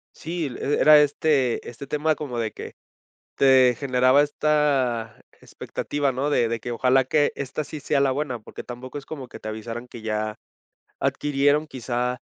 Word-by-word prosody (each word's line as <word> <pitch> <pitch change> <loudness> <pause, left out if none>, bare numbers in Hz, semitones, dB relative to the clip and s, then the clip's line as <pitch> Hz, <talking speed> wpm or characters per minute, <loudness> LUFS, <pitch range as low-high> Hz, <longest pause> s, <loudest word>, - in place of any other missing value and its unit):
Sí, 165 -1 -4
l 135 +3 -2
era 150 -1 +8
este 145 -3 +1
este 125 +3 -9
tema 150 +2 +1
como 135 -5 -5
de 110 -2 -1
que - - -9 0.6
te 130 -2 +5
generaba 130 +1 +4
esta 140 -7 0 0.2
expectativa, 145 -2 -3
¿no?, 140 +4 -1
de 120 -5 +2
de 115 -1 -3
que 120 - -5
ojalá 130 +3 +3
que 145 +3 +2
esta 140 +2 -4
sí 150 +1 -8
sea 140 +1 0
la 140 -1 +3
buena, 135 -3 -3
porque 105 - -10
tampoco 125 +3 -8
es 140 - -11
como 135 -5 -7
que - - -11
te 110 - -7
avisaran 115 +3 -6
que 120 -2 -10
ya 110 -1 -2 0.6
adquirieron 145 +1 +1
quizá 125 -2 -3
130 Hz, 170 wpm, -24 LUFS, 120-145 Hz, 0.6 s, era